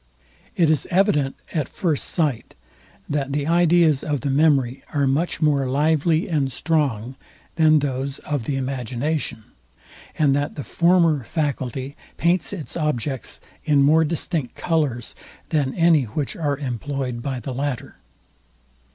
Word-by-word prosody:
It 170 - +3
is 155 - 0
evident 150 -7 +2 0.2
at 150 -5 -1
first 165 -7 0
sight, 145 -9 -1 0.5
that 140 -2 -2
the 145 0 -1
ideas 170 -3 +3
of 150 -3 -2
the 140 - -1
memory 140 -3 +2
are 140 -1 +2
much 155 +5 0
more 140 -3 +2
lively 155 +5 +2
and 145 -7 0
strong 130 -5 -1 0.4
than 155 -1 +5
those 135 -1 -2
of 145 -6 -3
the 140 - -1
imagination, 130 0 -2 0.7
and 140 -3 +3
that 145 0 -2
the 145 - -5
former 170 -4 +3
faculty 135 -1 -3 0.2
paints 170 0 +1
its 180 -7 -5
objects 145 -5 -2 0.2
in 145 -3 +3
more 155 +3 +5
distinct 160 -3 -2
colours, 145 -8 -1 0.3
than 145 -5 0
any 165 -5 +4
which 135 +6 -3
are 145 -4 -1
employed 130 -1 -4
by 130 0 -3
the 130 +1 -5
latter. 135 0 -4
145 Hz, 135 wpm, -22 LUFS, 135-160 Hz, 0.7 s, than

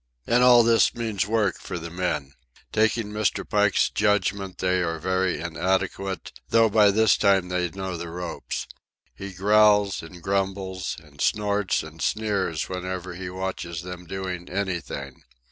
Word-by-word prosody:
And 120 +1 +3
all 120 -1 +8
this 115 0 +4
means 110 -4 -1
work 105 -3 +1
for 90 - -6
the 85 0 -7
men. 85 -6 -2 0.4
Taking 110 0 +1
Mr. 105 0 -1
Pike's 105 -2 +3
judgment, 100 -2 0
they 90 0 +1
are 85 -1 -1
very 95 +1 0
inadequate, 95 +3 -2 0.2
though 115 -1 +5
by 105 -1 +5
this 110 +1 +4
time 95 -3 +3
they 90 -1 0
know 95 +1 -5
the 85 0 -6
ropes. 85 0 -5 0.5
He 100 0 -8
growls 105 +1 +4
and 85 +1 -12
grumbles, 95 -2 -2
and 75 -2 -14
snorts 105 -1 +1
and 80 +1 -11
sneers 100 -7 -1
whenever 90 -1 -5
he 90 +1 -6
watches 90 -2 -4
them 90 -1 -8
doing 90 -1 -5
anything. 90 -8 -4
95 Hz, 145 wpm, -25 LUFS, 90-105 Hz, 0.5 s, all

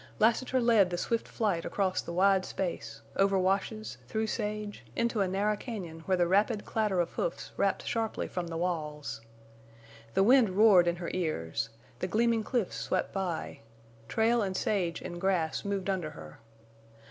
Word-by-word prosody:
Lassiter 245 +4 +3
led 230 -6 +4
the 175 - -2
swift 230 +5 -1
flight 195 -7 0
across 190 -2 0
the - - -7
wide 190 +2 +4
space, 185 -2 -4
over 195 0 +4
washes, 195 +4 -1
through 220 0 -1
sage, 210 - -3
into 235 -2 +1
a 195 - +2
narrow 200 +3 +1
cañon 195 -8 -6
where 190 -1 +3
the 175 - +3
rapid 205 +4 +2
clatter 210 -4 0
of 170 - 0
hoofs - - -3
rapped - - 0
sharply 225 -1 -1
from 180 -2 -4
the 165 -1 -4
walls. 150 -9 -3 0.9
The 195 - +5
wind 245 0 +6
roared 200 -5 +7
in 175 - +2
her 175 -1 -5
ears; 115 - -2 0.3
the 185 - -1
gleaming 230 +2 +2
cliffs 235 -4 -1
swept 185 - -1
by; 185 -4 -3 0.5
trail 225 - +2
and 190 -2 -1
sage 180 -5 -1
and 175 -1 -6
grass 180 -5 +1
moved 200 -1 -2
under 185 -5 -1
her. 75 -1 -11
195 Hz, 165 wpm, -30 LUFS, 175-215 Hz, 0.9 s, roared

